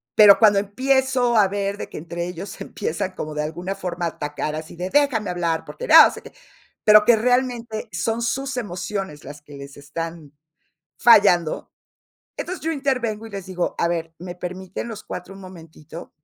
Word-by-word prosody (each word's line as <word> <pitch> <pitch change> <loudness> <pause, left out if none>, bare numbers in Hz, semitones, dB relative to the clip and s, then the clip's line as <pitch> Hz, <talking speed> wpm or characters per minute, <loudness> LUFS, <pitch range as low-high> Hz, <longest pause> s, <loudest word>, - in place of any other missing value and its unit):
pero 205 -2 +8
cuando 205 -3 +5
empiezo 255 +3 +1
a 205 -2 +5
ver 200 0 -2
de - - -7
que - - -9
entre 170 +2 -5
ellos 180 +3 -7
se 200 - -8
empiezan 195 0 -3
como 155 -3 -6
de 150 - -1
alguna 175 +5 -4
forma 175 -2 -4
a - - 0
atacar 150 0 -4
así 155 +2 -8
de: 180 +2 -4
"Déjame 250 -6 +2
hablar, 170 -2 -1
porque - - -8
no - - +9
sé - - -10
qué", - - -13 0.5
pero 210 0 +8
que 235 0 +6
realmente 240 -1 -1
son 220 +7 -2
sus 270 +3 -2
emociones 190 -6 -5
las 145 +2 -10
que 145 -1 -13
les 140 0 -10
están 160 +1 -7 0.7
fallando. 200 -8 +4 0.7
Entonces, 370 +1 -5
yo 325 - 0
intervengo 250 -7 -2
y - - -11
les 200 -2 -7
digo: 180 -2 -2
"A - - +2
ver, 165 -1 -3
¿me 175 0 -7
permiten 185 +4 -6
los 220 -2 -8
4 180 +2 -7
un 195 - -12
momentito?" 165 -3 -12
190 Hz, 185 wpm, -22 LUFS, 170-225 Hz, 0.7 s, no